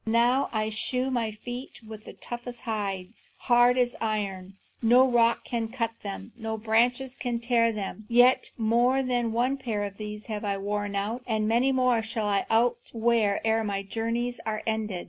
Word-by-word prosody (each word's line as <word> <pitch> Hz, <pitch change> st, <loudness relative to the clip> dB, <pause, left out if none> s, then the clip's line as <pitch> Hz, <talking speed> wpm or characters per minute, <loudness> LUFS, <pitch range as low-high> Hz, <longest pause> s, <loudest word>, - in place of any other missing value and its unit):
Now 240 Hz, +4 st, +2 dB
I 215 Hz, -1 st, -1 dB
shoe 250 Hz, +4 st, -1 dB
my 235 Hz, -3 st, 0 dB
feet 245 Hz, +5 st, -8 dB
with 215 Hz, -1 st, -10 dB
the -, -, -9 dB
toughest 240 Hz, 0 st, -7 dB
hides, 200 Hz, -2 st, -4 dB
hard 245 Hz, 0 st, +4 dB
as 245 Hz, -1 st, +1 dB
iron; 195 Hz, -4 st, -3 dB, 0.3 s
no 245 Hz, +3 st, +6 dB
rock 235 Hz, -2 st, +3 dB
can 230 Hz, -2 st, -2 dB
cut 230 Hz, -1 st, -2 dB
them, 200 Hz, +2 st, -7 dB
no 225 Hz, -1 st, -4 dB
branches 245 Hz, +4 st, +1 dB
can 245 Hz, -2 st, -2 dB
tear 235 Hz, -1 st, +2 dB
them. 210 Hz, 0 st, -6 dB
Yet 245 Hz, +2 st, +5 dB
more 240 Hz, +4 st, +2 dB
than 245 Hz, -2 st, 0 dB
one 250 Hz, +4 st, +1 dB
pair 225 Hz, -6 st, -2 dB
of 200 Hz, -1 st, -6 dB
these 210 Hz, 0 st, -6 dB
have 215 Hz, -2 st, -5 dB
I 200 Hz, -1 st, -1 dB
outworn, 205 Hz, +1 st, -3 dB
and 220 Hz, +1 st, -1 dB
many 240 Hz, +4 st, +3 dB
more 255 Hz, -3 st, +2 dB
shall 220 Hz, -1 st, -3 dB
I 200 Hz, -1 st, +1 dB
outwear 230 Hz, -2 st, +1 dB
ere 225 Hz, 0 st, +2 dB
my 200 Hz, -2 st, -2 dB
journeys 230 Hz, +4 st, -2 dB
are 215 Hz, -1 st, -3 dB
ended. 220 Hz, -4 st, -2 dB
225 Hz, 170 wpm, -27 LUFS, 215-245 Hz, 0.3 s, no